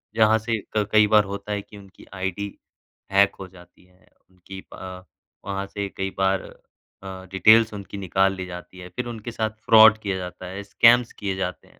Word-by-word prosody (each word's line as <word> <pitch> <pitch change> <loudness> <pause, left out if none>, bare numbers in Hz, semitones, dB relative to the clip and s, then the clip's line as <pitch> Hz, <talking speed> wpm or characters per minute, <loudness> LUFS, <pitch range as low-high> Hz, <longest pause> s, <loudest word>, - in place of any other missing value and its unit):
जहाँ 110 0 +4
से 115 0 -2 0.2
क 105 -1 +1
कई 110 -1 +5
बार 105 0 +5
होता 100 +1 -6
है 105 - -2
कि 105 - -15
उनकी 100 -1 -16
आइडी 95 +1 -4 0.6
हैक 100 0 +4
हो 95 - -7
जाती 90 -1 -19
है। 90 0 -28 0.2
उनकी 95 +1 -12
अ, - - -9 0.6
वहाँ 100 0 -3
से 100 0 -4
कई 95 0 -2
बार 95 0 +1 0.6
अ, 95 -1 -8
डिटेल्स 110 +4 +5
उनकी 100 0 -8
निकाल 95 0 +1
ली 95 -1 -6
जाती 90 +1 -10
है, 90 0 -10
फ़िर 125 +7 -5
उनके 115 0 -7
साथ 110 -1 -2 0.2
फ्रॉड 110 -2 +8
किया 100 -3 -3
जाता 90 0 -8
है, 95 +2 -7
स्कैम्स 120 +3 +4
किये 100 -2 -4
जाते 95 -1 -5
हैं। - - -24
100 Hz, 195 wpm, -23 LUFS, 95-110 Hz, 0.6 s, फ्रॉड